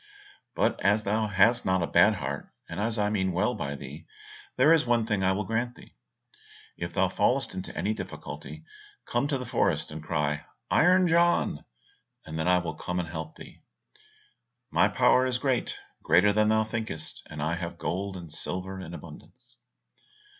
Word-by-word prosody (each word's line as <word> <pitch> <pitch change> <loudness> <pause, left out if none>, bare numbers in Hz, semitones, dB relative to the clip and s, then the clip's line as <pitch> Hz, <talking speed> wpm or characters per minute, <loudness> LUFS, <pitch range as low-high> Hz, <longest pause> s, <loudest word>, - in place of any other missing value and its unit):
But - - +1
as 105 +2 +3
thou 110 +2 0
hast 105 +4 +4
not 95 -1 +1
a - - +2
bad - - +5
heart, - - -5 0.2
and - - -6
as 110 +2 -1
I 105 0 +1
mean 95 -3 0
well 105 +8 +1
by 70 - -4
thee, 70 +5 -10 0.5
there 140 +6 +6
is 160 - +4
one 120 -2 +2
thing 105 -3 0
I 95 0 +3
will 100 +2 -1
grant 120 +4 -2
thee; - - -16 0.8
if - - -5
thou - - +3
fallest - - +1
into - - -6
any - - 0
difficulty, - - -8 0.4
come 120 +4 0
to 145 -2 0
the 125 - -6
forest - - +1
and 80 0 -6
cry, 75 -2 -1 0.3
'Iron 185 +2 +5
John,' 170 - +2 0.6
and 80 0 -5
then 80 - 0
I 90 0 +5
will 85 -2 -2
come 90 +3 -3
and 85 -2 -3
help 80 -1 -6
thee. - - -13 1.1
My - - +4
power 130 0 +4
is 125 -1 0
great, 130 -2 0 0.2
greater 90 +6 +4
than 105 +1 +3
thou 110 0 +3
thinkest, 110 -8 -4
and 75 - -8
I 80 +3 0
have 85 0 -4
gold 95 +4 -3
and 85 -3 -9
silver 95 +4 -4
in 85 -2 -7
abundance." 80 -3 -13
95 Hz, 180 wpm, -28 LUFS, 85-115 Hz, 1.1 s, there